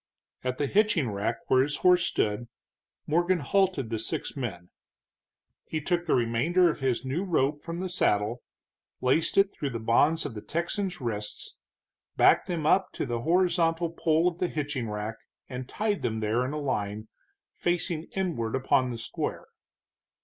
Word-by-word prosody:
At 130 Hz, 0 st, -2 dB
the 145 Hz, -, 0 dB
hitching 180 Hz, -, +2 dB
rack 105 Hz, +3 st, -1 dB
where 130 Hz, -, +4 dB
his 145 Hz, +2 st, -1 dB
horse 180 Hz, -1 st, +4 dB
stood, 105 Hz, +3 st, -1 dB, 0.6 s
Morgan 175 Hz, +4 st, +2 dB
halted 180 Hz, -, +1 dB
the 110 Hz, -, -1 dB
six 115 Hz, -, -4 dB
men. 95 Hz, -10 st, -5 dB, 0.9 s
He 155 Hz, -, -3 dB
took 175 Hz, +3 st, -1 dB
the 165 Hz, -, +3 dB
remainder 130 Hz, +10 st, +3 dB
of -, -, -8 dB
his 130 Hz, -2 st, 0 dB
new 140 Hz, +8 st, -1 dB
rope 145 Hz, -5 st, +1 dB
from 170 Hz, +1 st, -5 dB
the 190 Hz, -, -2 dB
saddle, 115 Hz, -, +1 dB, 0.6 s
laced 145 Hz, +6 st, +2 dB
it 195 Hz, 0 st, +4 dB
through 145 Hz, -, -3 dB
the 120 Hz, -3 st, -4 dB
bonds 145 Hz, +8 st, +3 dB
on 135 Hz, -, -4 dB
the 105 Hz, -, -7 dB
Texans' 175 Hz, -, -3 dB
wrists, 105 Hz, -3 st, -4 dB, 0.6 s
backed -, -, +5 dB
them 170 Hz, -4 st, -2 dB
up 185 Hz, +4 st, +3 dB
to -, -, -2 dB
the 120 Hz, -1 st, -2 dB
horizontal 170 Hz, +1 st, +2 dB
pole 165 Hz, 0 st, +2 dB
of 175 Hz, -1 st, -2 dB
the 180 Hz, -, +1 dB
hitching 145 Hz, -7 st, -3 dB
rack, 105 Hz, +1 st, -4 dB, 0.3 s
and 125 Hz, 0 st, -6 dB
tied 210 Hz, -2 st, -1 dB
them 110 Hz, -1 st, -1 dB
there 110 Hz, +3 st, +1 dB
in 130 Hz, -, -3 dB
a 150 Hz, -, -2 dB
line, 110 Hz, -6 st, -2 dB, 0.5 s
facing 175 Hz, -2 st, -1 dB
inward 160 Hz, -12 st, -1 dB
upon 130 Hz, -1 st, +2 dB
the 120 Hz, -, -4 dB
square. 115 Hz, -, -4 dB
145 Hz, 165 wpm, -28 LUFS, 115-175 Hz, 0.9 s, backed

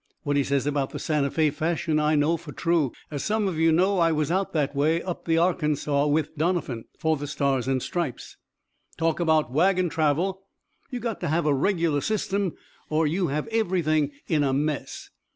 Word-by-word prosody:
What 145 Hz, -2 st, 0 dB
he 140 Hz, -, +3 dB
says 140 Hz, 0 st, 0 dB
about 145 Hz, -2 st, 0 dB
the -, -, -6 dB
Santa 150 Hz, -3 st, 0 dB
Fé 155 Hz, 0 st, +1 dB
fashion 160 Hz, 0 st, 0 dB
I 150 Hz, +1 st, +2 dB
know 150 Hz, +3 st, +3 dB
for 165 Hz, -2 st, -9 dB
true. 160 Hz, -1 st, +1 dB, 0.2 s
As 145 Hz, -2 st, -3 dB
some 215 Hz, -1 st, 0 dB
of 170 Hz, -4 st, -2 dB
you 165 Hz, 0 st, +4 dB
know, 185 Hz, +4 st, +3 dB
I 165 Hz, -1 st, +4 dB
was 155 Hz, 0 st, 0 dB
out 190 Hz, +2 st, 0 dB
that 145 Hz, -3 st, 0 dB
way, 155 Hz, +4 st, +2 dB
up 180 Hz, -2 st, -5 dB
the 165 Hz, -1 st, +2 dB
Arkansas, 150 Hz, -4 st, +1 dB
with 150 Hz, +1 st, 0 dB
Doniphan, 155 Hz, -8 st, -1 dB
for 160 Hz, -1 st, +1 dB
the 145 Hz, +1 st, -5 dB
Stars 135 Hz, -3 st, 0 dB
and 130 Hz, -1 st, 0 dB
Stripes. 170 Hz, -8 st, -4 dB, 0.6 s
Talk 165 Hz, 0 st, 0 dB
about 160 Hz, -6 st, +2 dB
wagon 180 Hz, +3 st, +3 dB
travel 165 Hz, +5 st, 0 dB, 0.5 s
you 250 Hz, -3 st, -4 dB
got 230 Hz, -3 st, -3 dB
to 175 Hz, -, -3 dB
have 160 Hz, +2 st, +1 dB
a 150 Hz, -, +3 dB
regular 165 Hz, -1 st, +1 dB
system 200 Hz, -2 st, -1 dB, 0.4 s
or 155 Hz, +1 st, +2 dB
you 175 Hz, +4 st, 0 dB
have 150 Hz, +2 st, -2 dB
everything 175 Hz, -9 st, +1 dB, 0.2 s
in 155 Hz, -3 st, +2 dB
a 135 Hz, -2 st, +1 dB
mess. 145 Hz, +1 st, -3 dB
155 Hz, 195 wpm, -25 LUFS, 145-175 Hz, 0.6 s, you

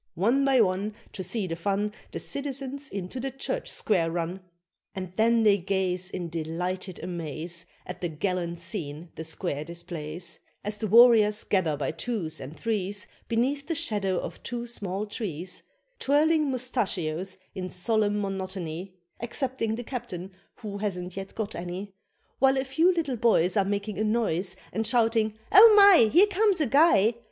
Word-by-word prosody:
One 235 Hz, +10 st, +2 dB
by 270 Hz, -3 st, +4 dB
one, 200 Hz, +1 st, 0 dB, 0.2 s
To -, -, -5 dB
see 190 Hz, +3 st, -2 dB
the 165 Hz, -2 st, -3 dB
fun 200 Hz, +4 st, -1 dB, 0.2 s
The -, -, -5 dB
citizens 275 Hz, 0 st, -4 dB
into 195 Hz, +5 st, -5 dB
the 270 Hz, +2 st, -2 dB
Church 270 Hz, +1 st, -3 dB
square 175 Hz, -6 st, +1 dB
run, 170 Hz, +2 st, -3 dB, 0.6 s
And 185 Hz, -2 st, -5 dB
then 230 Hz, +2 st, +3 dB
they 205 Hz, -2 st, +5 dB
gaze 185 Hz, 0 st, -1 dB
In 180 Hz, -3 st, -4 dB
delighted 170 Hz, +3 st, -4 dB
amaze 170 Hz, 0 st, -5 dB, 0.2 s
At 180 Hz, -, -8 dB
the 175 Hz, -, -1 dB
gallant 170 Hz, +1 st, -2 dB
scene 170 Hz, -3 st, -5 dB
the 160 Hz, -, -6 dB
square 160 Hz, -2 st, -3 dB
displays, 170 Hz, 0 st, -6 dB, 0.2 s
As 210 Hz, +1 st, -2 dB
the 215 Hz, -, -2 dB
warriors 220 Hz, -1 st, +6 dB
gather 170 Hz, -7 st, +1 dB
by 145 Hz, -, -1 dB
twos 165 Hz, -4 st, -3 dB
and 140 Hz, +5 st, -8 dB
threes 205 Hz, -2 st, -2 dB, 0.2 s
Beneath 270 Hz, +5 st, 0 dB
the 330 Hz, -, -1 dB
shadow 205 Hz, -, 0 dB
of -, -, -5 dB
two 240 Hz, 0 st, -4 dB
small 205 Hz, -4 st, -3 dB
trees, 185 Hz, -5 st, -5 dB, 0.4 s
Twirling 300 Hz, +2 st, +3 dB
mustachios 195 Hz, -9 st, -1 dB, 0.2 s
in 185 Hz, -2 st, -4 dB
solemn 210 Hz, +2 st, +1 dB
monotony 190 Hz, -2 st, -4 dB, 0.2 s
Excepting 240 Hz, -2 st, -2 dB
the 245 Hz, -, -5 dB
captain, 225 Hz, -8 st, -6 dB, 0.3 s
who 205 Hz, -2 st, -5 dB
hasn't 180 Hz, -3 st, -3 dB
yet 195 Hz, 0 st, -7 dB
got 215 Hz, -2 st, -3 dB
any, 180 Hz, +3 st, -6 dB, 0.5 s
While 270 Hz, 0 st, +4 dB
a 265 Hz, -, +1 dB
few 320 Hz, +7 st, +3 dB
little 310 Hz, -8 st, -1 dB
boys 210 Hz, -6 st, +3 dB
Are 200 Hz, -2 st, +3 dB
making 200 Hz, +1 st, -2 dB
a -, -, +2 dB
noise 215 Hz, -5 st, 0 dB, 0.2 s
And 225 Hz, 0 st, 0 dB
shouting, 225 Hz, -2 st, +2 dB
"Oh 430 Hz, +2 st, +9 dB
my! 390 Hz, -, +8 dB
Here 360 Hz, +6 st, +7 dB
comes 410 Hz, -2 st, +2 dB
a 305 Hz, -, +3 dB
guy! 245 Hz, -, +5 dB
205 Hz, 160 wpm, -27 LUFS, 180-240 Hz, 0.6 s, Oh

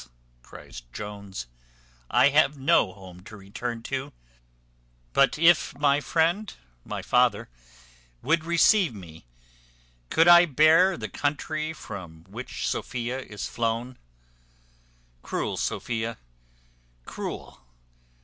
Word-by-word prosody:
cries -, -, -12 dB
Jones, 100 Hz, -7 st, -7 dB, 0.6 s
"I 140 Hz, -, +5 dB
have 145 Hz, 0 st, +3 dB
no 130 Hz, -7 st, +3 dB
home 90 Hz, -2 st, -13 dB
to 110 Hz, -, -11 dB
return 115 Hz, +4 st, -6 dB
to; 135 Hz, +1 st, -4 dB, 1.0 s
but 140 Hz, +1 st, +3 dB
if 165 Hz, -1 st, +4 dB
my 140 Hz, 0 st, +3 dB
friend, 170 Hz, +7 st, 0 dB, 0.3 s
my -, -, -6 dB
father, -, -, +2 dB, 0.7 s
would 165 Hz, +2 st, +2 dB
receive 170 Hz, -, +3 dB
me, 80 Hz, -8 st, -12 dB, 0.8 s
could 165 Hz, +1 st, +4 dB
I 175 Hz, 0 st, +8 dB
bear 160 Hz, +5 st, +4 dB
the 110 Hz, -, -5 dB
country 155 Hz, -, -2 dB
from 90 Hz, -, -9 dB
which 110 Hz, +8 st, -6 dB
Sophia 125 Hz, +1 st, -3 dB
is 105 Hz, -6 st, -7 dB
flown? 115 Hz, +2 st, -3 dB, 1.2 s
Cruel -, -, -3 dB
Sophia! 115 Hz, -1 st, -3 dB, 0.9 s
Cruel! -, -, -7 dB
130 Hz, 100 wpm, -26 LUFS, 105-155 Hz, 1.2 s, I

